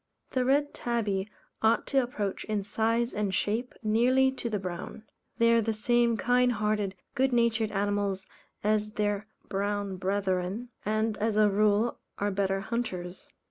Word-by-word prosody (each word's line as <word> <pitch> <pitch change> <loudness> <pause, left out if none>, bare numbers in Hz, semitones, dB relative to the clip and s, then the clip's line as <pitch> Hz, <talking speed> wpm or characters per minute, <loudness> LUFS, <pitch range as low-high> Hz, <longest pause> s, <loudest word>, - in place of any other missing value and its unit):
The 255 - +1
Red 285 +3 +2
Tabby 210 -5 -1 0.3
ought 220 +1 +3
to 270 - +5
approach 210 -6 -3
in 210 -2 -1
size, 230 +3 0
and 205 -2 -1
shape, 225 +6 -1
nearly 250 +5 +4
to 250 -3 -4
the 215 - 0
Brown. 185 +3 -6 0.3
They 230 0 +5
are 230 - +5
the 225 0 0
same 235 +1 +2
kind 245 +1 +3
hearted, 210 -2 0 0.2
good 265 +1 +2
natured 230 -2 +2
animals 200 -1 -1 0.4
as 210 0 +1
their 205 0 -1 0.2
brown 200 -1 -2
brethren, 190 +3 -1
and 215 +1 0
as 215 0 0
a 210 -1 +5
rule 210 +3 +2 0.2
are 205 0 0
better 195 0 0
hunters. 190 -6 -4
215 Hz, 150 wpm, -29 LUFS, 200-235 Hz, 0.4 s, to